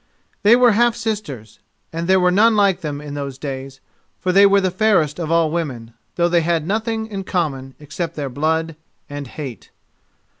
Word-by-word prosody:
They 210 +3 +6
were 245 -1 +5
half 235 +2 +3
sisters, 205 - -5 0.3
and 165 +1 -3
there 190 0 +4
were 180 0 +3
none 220 +4 +4
like 195 -3 +2
them 145 -3 -4
in 145 -1 -8
those 140 -2 -5
days, 135 -1 -7 0.4
for 185 - 0
they 200 +2 +6
were 200 0 +4
the 190 -2 0
fairest 185 -7 +1
of 165 -3 -3
all 165 -2 +2
women, 130 -9 -4 0.2
though 170 0 +2
they 175 -1 +2
had 165 -1 0
nothing 220 +3 -2
in 200 -3 -6
common 140 -8 -3
except 160 +3 -5
their 145 -2 -3
blood 160 +4 -1 0.3
and 145 -1 -7
hate. 130 -3 -8
170 Hz, 185 wpm, -20 LUFS, 145-200 Hz, 0.4 s, They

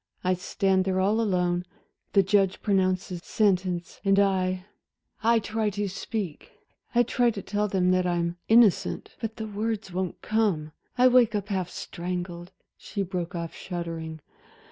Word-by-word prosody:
I 185 0 +3
stand 190 +1 +1
there 190 -1 +1
all 205 +4 +2
alone, 180 -4 +1 0.5
the 195 - +6
judge 195 0 +2
pronounces 185 -3 +1
sentence, 185 -4 0
and 195 -1 +3
I 185 -2 +2 0.6
I 230 +1 +4
try 220 0 -1
to 205 0 -2
speak, 195 -3 -5 0.4
I 240 - +6
try 245 0 +2
to 210 -3 -4
tell 210 +1 0
them 185 -2 +2
that 185 0 +2
I'm 170 0 -1
innocent, 225 -4 +4
but 225 -1 -3
the 220 - -5
words 215 -2 -3
won't 185 -1 -2
come 200 -9 +1 0.3
I 250 +1 +7
wake 245 -3 +5
up 200 -1 -2
half 185 -3 -1
strangled" 175 0 -5 0.3
she 200 - -3
broke 180 -1 -4
off 170 -1 -4
shuddering. 165 -3 -5
190 Hz, 150 wpm, -27 LUFS, 180-210 Hz, 0.6 s, I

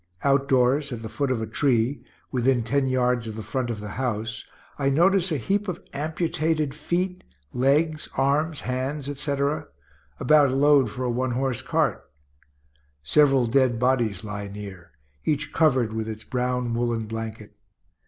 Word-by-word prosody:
Outdoors, 135 0 +2
at 115 -2 -5
the 110 - -5
foot 140 +4 -1
of 120 -4 0
a - - -1
tree, 120 +1 +1 0.3
within 125 -1 +2
ten 135 +4 +1
yards 125 -2 +1
of 110 - -6
the 110 - -6
front 125 +3 -2
of 115 -3 -3
the 105 0 -7
house, 110 -3 -2 0.4
I 135 -1 +2
notice 180 +5 +3
a 155 - +1
heap 200 - -1
of 180 - -3
amputated 155 -1 -1
feet, 180 +4 -2 0.3
legs, 150 +5 +1
arms, 145 +3 +1
hands, 130 +3 -3
etc. 140 +1 -1 0.5
about 145 0 +5
a - - -1
load 140 -3 +5
for 130 +4 -5
a 125 - 0
one 125 +1 -1
horse 130 -1 -1
cart. - - 0 1.0
Several 135 - +4
dead 125 0 +2
bodies 120 -6 +1
lie 105 -1 -5
near, 100 -5 -9 0.3
each 145 - -1
covered 130 -8 +2
with 110 0 -3
its 110 0 -6
brown 125 -1 -1
woollen 115 -1 -1
blanket. 110 -1 -6
130 Hz, 155 wpm, -25 LUFS, 115-145 Hz, 1.0 s, about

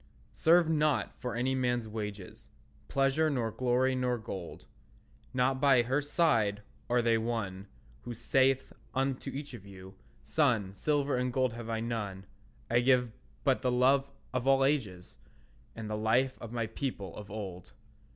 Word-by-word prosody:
Serve 170 +1 +4
not 155 -2 +1
for 125 -1 -4
any 125 +2 0
man's 125 -3 0
wages, 105 -3 -7 0.4
Pleasure 135 +3 +2
nor 120 -6 -1
glory 130 +2 +1
nor 125 -1 0
gold; 95 -5 -7 0.7
Not 130 +1 +1
by 135 -4 +5
her 130 +5 +1
side 115 - +1 0.3
are 120 0 +3
they 115 -1 +3
won 105 -4 -3 0.3
Who 120 - -6
saith 135 +3 +2 0.2
unto 135 0 -1
each 140 0 -6
of 115 -6 -9
you, 95 -1 -12 0.3
"Son, 120 -11 +1
Silver 145 +5 0
and 125 0 0
gold 130 -1 +1
have 115 -1 -7
I 110 -1 -1
none; 105 -5 -4 0.4
I 120 - +3
give 125 -1 +3 0.3
but 135 -3 +2
the 125 -2 +1
love 135 +3 +3 0.2
of 125 0 -1
all 135 0 +5
ages, 105 -11 -2 0.6
And 115 -1 -6
the 105 - -2
life 120 +5 +2
of 115 - -7
my 120 -2 -1
people 110 -5 -5
of 105 -2 -9
old." 95 -4 -7
125 Hz, 155 wpm, -31 LUFS, 110-135 Hz, 0.7 s, by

